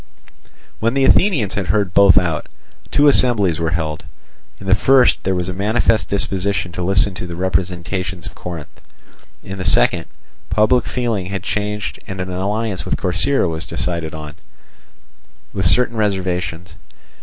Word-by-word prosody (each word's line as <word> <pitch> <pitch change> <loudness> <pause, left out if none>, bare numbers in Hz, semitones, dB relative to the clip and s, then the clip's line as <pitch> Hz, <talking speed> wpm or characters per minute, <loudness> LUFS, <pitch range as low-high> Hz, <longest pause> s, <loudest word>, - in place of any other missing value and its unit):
When 115 +3 0
the 135 -1 +3
Athenians 145 - +3
had 100 -3 -3
heard 100 -1 0
both 100 -2 +6
out, 85 -4 +1 0.4
two 145 - +4
assemblies 105 - +3
were 85 -1 0
held. 80 -2 -3 0.6
In 100 - -10
the 95 - +2
first 130 +6 +4
there 95 0 +1
was 90 0 -2
a 95 - -3
manifest 110 +3 +1
disposition 95 -2 -1
to 90 - -6
listen 95 +2 +2
to 90 - -6
the 85 - -6
representations 90 0 -2
of - - -8
Corinth; 85 -4 -9 0.6
in 95 0 -7
the - - -3
second, - - +3 0.4
public 110 +3 +3
feeling 115 -7 -2
had 95 -1 -4
changed 105 0 -3
and 95 0 -6
an 90 0 -4
alliance 100 +2 -2
with - - -2
Corcyra 90 +7 +1
was 80 -1 -2
decided 85 -3 -3
on, 75 -1 -8 1.2
with 95 -3 +1
certain 120 +4 +2
reservations. 90 -4 -2
95 Hz, 155 wpm, -19 LUFS, 90-105 Hz, 1.2 s, both